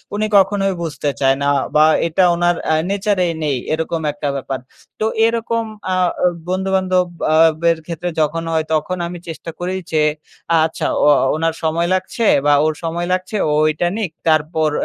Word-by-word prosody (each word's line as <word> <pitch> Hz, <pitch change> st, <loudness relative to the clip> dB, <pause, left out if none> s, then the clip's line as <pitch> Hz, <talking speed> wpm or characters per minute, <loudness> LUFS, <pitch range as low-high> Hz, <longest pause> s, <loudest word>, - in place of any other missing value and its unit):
উনি 215 Hz, +1 st, 0 dB
কখনোই 195 Hz, 0 st, +2 dB
বুঝতে 150 Hz, -3 st, -3 dB
চায় 135 Hz, -1 st, +3 dB
না। 140 Hz, -, +2 dB, 0.3 s
বা 155 Hz, 0 st, +6 dB, 0.2 s
এটা 170 Hz, +3 st, +2 dB
উনার 175 Hz, 0 st, +2 dB, 0.2 s
আ -, -, +3 dB
নেচার 200 Hz, +1 st, 0 dB
এই 170 Hz, -, -1 dB
নেই। 145 Hz, -3 st, 0 dB, 0.2 s
এরকম 160 Hz, +1 st, -2 dB
একটা 145 Hz, 0 st, -4 dB
ব্যাপার। 135 Hz, -1 st, -4 dB, 0.4 s
তো 215 Hz, -, 0 dB, 0.2 s
এরকম 230 Hz, 0 st, 0 dB, 0.3 s
আ -, -, +1 dB, 0.3 s
অ -, -, +5 dB, 0.2 s
বন্ধু-বান্ধব 185 Hz, -1 st, +1 dB, 0.3 s
আ -, -, +4 dB, 0.3 s
বের 170 Hz, -1 st, +3 dB
ক্ষেত্রে 170 Hz, +1 st, -4 dB
যখন 160 Hz, +2 st, 0 dB
হয়, 160 Hz, -1 st, 0 dB
তখন 155 Hz, +4 st, -1 dB
আমি 175 Hz, +1 st, -7 dB
চেষ্টা 165 Hz, 0 st, -7 dB
করি 180 Hz, +1 st, -2 dB, 0.2 s
যে 155 Hz, -1 st, +2 dB, 0.6 s
আচ্ছা 160 Hz, -, -3 dB, 0.2 s
ও -, -, +5 dB, 0.3 s
ওনার 165 Hz, +1 st, 0 dB
সময় 165 Hz, +2 st, 0 dB
লাগছে 185 Hz, +5 st, -1 dB, 0.2 s
বা 145 Hz, -, +5 dB
ওর 155 Hz, -, +1 dB
সময় 170 Hz, +1 st, -2 dB
লাগছে 185 Hz, +3 st, -3 dB
ও -, -, +1 dB
ঐটা 155 Hz, +3 st, +1 dB
নিক। 205 Hz, -7 st, -2 dB, 0.2 s
তারপর 155 Hz, 0 st, +2 dB
170 Hz, 175 wpm, -18 LUFS, 155-185 Hz, 0.6 s, বা